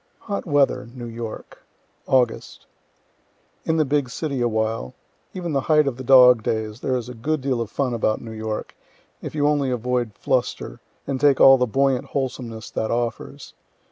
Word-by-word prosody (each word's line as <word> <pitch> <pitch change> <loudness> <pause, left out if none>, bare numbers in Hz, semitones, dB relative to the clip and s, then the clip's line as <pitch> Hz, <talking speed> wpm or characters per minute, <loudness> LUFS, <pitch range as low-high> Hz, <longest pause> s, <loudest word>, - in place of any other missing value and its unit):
HOT 200 -3 -4
WEATHER 145 -5 +1
NEW 120 -1 -7
YORK 115 -1 -8 0.5
August. 125 -3 0 1.0
In 160 - +1
the 155 - +3
big 140 -2 0
city 140 0 -3
awhile. 110 - -1 0.4
Even 175 -4 -4
the 135 - +1
height 150 +1 +3
of 135 -3 -2
the 130 - -7
dog 125 -2 +7
days, 110 0 -3
there 130 - -1
is 125 -1 -3
a 125 - -7
good 150 +7 -2
deal 130 -3 -1
of 115 - -4
fun 130 -3 -1
about 110 -2 0
New 115 - -9
York, 110 -1 -5 0.5
if - - -7
you 145 -1 +2
only 145 -3 +1
avoid 125 -3 -2
fluster, - - -2 0.3
and 135 -2 -3
take 145 -2 +4
all 135 -1 +8
the 125 - +2
buoyant 135 +2 +1
wholesomeness 125 -5 -5
that 110 - -2
offers. 120 0 -4
125 Hz, 170 wpm, -22 LUFS, 115-140 Hz, 1.0 s, all